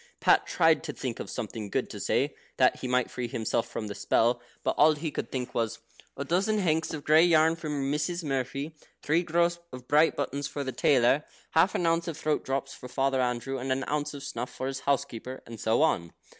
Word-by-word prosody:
Pat - - +4
tried - - +3
to - - -4
think - - -4
of - - -6
something 105 -3 -5
good - - -1
to - - -7
say, - - +1 0.2
that - - +4
he 130 - -5
might 125 -1 +1
free 125 -1 -3
himself 115 0 -1
from 110 - -4
the 105 - -5
spell, 120 +4 +2 0.2
but - - +1
all 155 +1 +6
he 155 +1 -4
could - - -4
think 125 -2 -3
of - - -22
was: 115 -2 -1 0.4
"A 140 - -3
dozen 195 +8 +1
hanks 160 -5 +1
of 150 -3 -5
grey 155 +2 +6
yarn 160 -1 +5
for 160 -2 -6
Missis 150 +5 -1
Murphy." 140 +2 -3 0.3
"Three 160 +4 +2
gross 170 0 +1
of 125 0 -10
bright 150 +2 +4
buttons 140 0 -2
for 145 - -4
the 130 - -3
tailor." 135 +1 +3 0.3
"Half 165 +4 +3
an 175 - 0
ounce 165 +1 +1
of 165 -2 -4
throat 155 -1 0
drops 135 0 -2
for 125 - -10
Father 135 0 +1
Andrew, 125 +2 -1
and 130 +1 -3
an 130 +1 0
ounce 150 0 -2
of 140 - -8
snuff 120 +2 -4
for 130 - -5
his 135 0 -3
housekeeper," 130 -2 -2
and 115 -1 -9
so 115 +8 +2
on. 85 - +1
140 Hz, 225 wpm, -28 LUFS, 125-160 Hz, 0.4 s, all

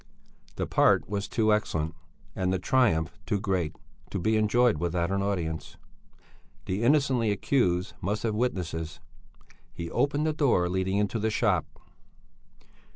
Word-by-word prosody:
The - - -2
part - - +3
was 100 0 -3
too 110 -2 +2
excellent 80 -7 -1 0.4
and 95 -1 0
the 95 - +1
triumph 90 - +1
too 100 - 0
great 95 -6 -1 0.3
to - - -3
be 110 +5 +1
enjoyed 110 -1 +3
without 85 +1 -1
an 100 0 0
audience. 85 -5 -3 0.9
The 95 +3 -2
innocently 130 -3 +3
accused 95 -4 +1
must 105 +4 -2
have 115 -2 0
witnesses. 85 -9 -2 0.7
He 85 -1 -6
opened 145 +2 +1
the 155 - +1
door 130 - +2
leading 95 +2 0
into 105 +2 0
the 110 +1 0
shop. 105 -6 +1
100 Hz, 140 wpm, -28 LUFS, 90-115 Hz, 0.9 s, part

